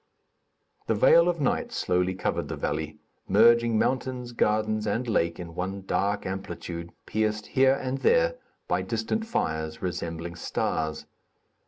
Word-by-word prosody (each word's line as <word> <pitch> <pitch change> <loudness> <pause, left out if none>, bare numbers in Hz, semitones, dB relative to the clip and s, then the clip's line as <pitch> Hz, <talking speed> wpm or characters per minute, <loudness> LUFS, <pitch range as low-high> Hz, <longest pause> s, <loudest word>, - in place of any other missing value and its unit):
The 115 - +2
veil 165 +10 +6
of 170 -2 -1
night 140 - 0
slowly 90 +1 0
covered 95 - -2
the - - -4
valley, 75 +1 -3 0.3
merging 115 +1 +5
mountains, 130 0 -1
gardens 110 -1 +1
and 115 +4 -1
lake 85 -6 +1
in 85 -2 -7
one 95 +3 -4
dark 100 +1 0
amplitude, 90 -3 -5
pierced 110 0 -1
here 135 0 +4
and 135 0 -3
there - - +3 0.3
by - - +1
distant 225 0 -2
fires, 80 - -2
resembling 85 -1 -4
stars. 80 -2 -2
105 Hz, 135 wpm, -27 LUFS, 85-125 Hz, 0.3 s, veil